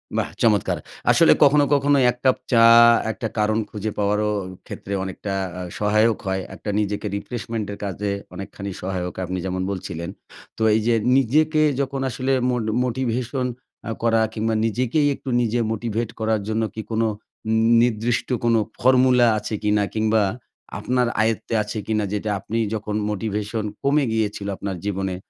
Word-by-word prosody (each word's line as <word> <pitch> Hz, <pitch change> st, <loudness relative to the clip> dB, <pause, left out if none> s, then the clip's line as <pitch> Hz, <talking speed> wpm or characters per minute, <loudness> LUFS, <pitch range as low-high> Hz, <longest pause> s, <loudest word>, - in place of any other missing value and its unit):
বাহ! -, -, 0 dB
চমৎকার। 105 Hz, -4 st, +2 dB, 0.3 s
আসলে -, -, +6 dB
কখনো, 145 Hz, +1 st, +5 dB
কখনো 145 Hz, 0 st, +3 dB
১ 125 Hz, -, -11 dB
কাপ 130 Hz, -, +4 dB
চা 115 Hz, -2 st, +6 dB, 0.5 s
একটা 100 Hz, -, -4 dB
কারণ 105 Hz, +1 st, +2 dB
খুঁজে 105 Hz, 0 st, -4 dB
পাওয়ারও 105 Hz, +1 st, +1 dB, 0.4 s
ক্ষেত্রে 100 Hz, -, -6 dB
অনেকটা 95 Hz, +1 st, -5 dB, 0.3 s
আ -, -, -4 dB, 0.2 s
সহায়ক 105 Hz, +1 st, +3 dB
হয়। 95 Hz, 0 st, -1 dB
একটা -, -, -7 dB
নিজেকে 105 Hz, 0 st, -2 dB
রিফ্রেশমেন্ট 110 Hz, +1 st, -4 dB
এর -, -, -8 dB
কাজে 100 Hz, +1 st, -3 dB, 0.2 s
অনেকখানি 100 Hz, +1 st, -6 dB
সহায়ক 90 Hz, -1 st, -3 dB
আপনি 90 Hz, +1 st, -3 dB
যেমন 95 Hz, 0 st, -2 dB
বলছিলেন। 85 Hz, -3 st, -5 dB, 0.5 s
তো -, -, -8 dB
এই -, -, +3 dB
যে 120 Hz, -, +4 dB, 0.2 s
নিজেকে 155 Hz, +5 st, +2 dB, 0.2 s
যখন 135 Hz, 0 st, -3 dB
আসলে 130 Hz, +2 st, -2 dB, 0.2 s
মোট 125 Hz, -2 st, 0 dB, 0.2 s
মোটিভেশন 125 Hz, +1 st, -1 dB, 0.4 s
আ -, -, -3 dB
করা 115 Hz, -1 st, +3 dB
কিংবা 110 Hz, 0 st, -1 dB
নিজেকেই 125 Hz, +6 st, +1 dB
একটু 135 Hz, -, -8 dB
নিজে 120 Hz, 0 st, 0 dB
মোটিভেট 115 Hz, 0 st, -2 dB
করার 110 Hz, -1 st, 0 dB
জন্য 110 Hz, +1 st, 0 dB
কি 110 Hz, -, -3 dB
কোনো 115 Hz, 0 st, +1 dB, 0.7 s
নির্দিষ্ট 120 Hz, 0 st, 0 dB, 0.2 s
কোনো 115 Hz, -1 st, +3 dB, 0.2 s
ফর্মুলা 125 Hz, -1 st, +5 dB
আছে 105 Hz, +1 st, -5 dB
কিনা? 105 Hz, 0 st, +2 dB
কিংবা 110 Hz, 0 st, +2 dB, 0.6 s
আপনার 125 Hz, -1 st, +1 dB
আয়ত্তে 110 Hz, 0 st, -1 dB
আছে 105 Hz, +1 st, -6 dB
কিনা? 110 Hz, -1 st, 0 dB
যেটা 105 Hz, +1 st, -2 dB
আপনি 110 Hz, +4 st, -4 dB, 0.2 s
যখন 105 Hz, -1 st, -3 dB
মোটিভেশন 105 Hz, +1 st, -3 dB, 0.2 s
কমে 145 Hz, +1 st, +3 dB
গিয়েছিল 105 Hz, -2 st, -1 dB
আপনার 100 Hz, -2 st, -4 dB
জীবনে 95 Hz, -2 st, -2 dB
110 Hz, 150 wpm, -22 LUFS, 105-120 Hz, 0.7 s, আসলে